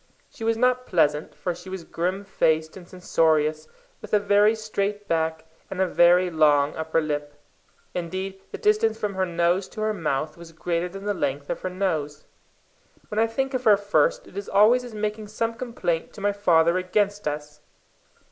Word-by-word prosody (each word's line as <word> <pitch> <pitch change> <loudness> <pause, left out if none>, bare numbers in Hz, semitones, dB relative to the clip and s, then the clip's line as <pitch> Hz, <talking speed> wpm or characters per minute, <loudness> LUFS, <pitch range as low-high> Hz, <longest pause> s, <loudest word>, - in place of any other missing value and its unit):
She 275 -6 -10
was 225 0 +1
not 250 +1 +2
pleasant, 150 -4 +1
for 180 - -3
she 185 - -11
was 190 -2 -6
grim 185 +5 -3
faced 160 -4 +1
and 180 -3 -11
censorious, 155 -3 +1 0.3
with 215 -1 -1
a - - +5
very 205 +2 +4
straight 205 -2 -3
back, 160 -1 -1 0.2
and 190 - -6
a 190 - +4
very 175 0 +4
long 150 -2 +3
upper 160 0 0
lip. 145 -1 -3 0.6
Indeed 190 +2 -4
the - - -5
distance 430 +2 +2
from 210 -1 -2
her 190 0 0
nose 175 +2 +1
to 215 - -7
her 215 0 +1
mouth 155 -5 -2
was 170 -1 -12
greater 170 +1 -2
than 195 +2 -9
the 205 - 0
length 140 -5 -2
of - - -4
her 185 - -2
nose. 160 -6 -2 0.8
When 210 - -2
I 225 - +4
think 265 +4 -2
of 255 -1 -2
her 210 -2 +7
first, - - +1
it - - -16
is 405 - -5
always 225 +5 +5
as 240 -3 -9
making 215 0 -3
some 225 +2 -2
complaint 215 -9 -3
to 205 - -10
my 205 0 +2
father 175 -3 +3
against 205 +1 0
us. 150 0 -5
185 Hz, 185 wpm, -25 LUFS, 160-210 Hz, 0.8 s, her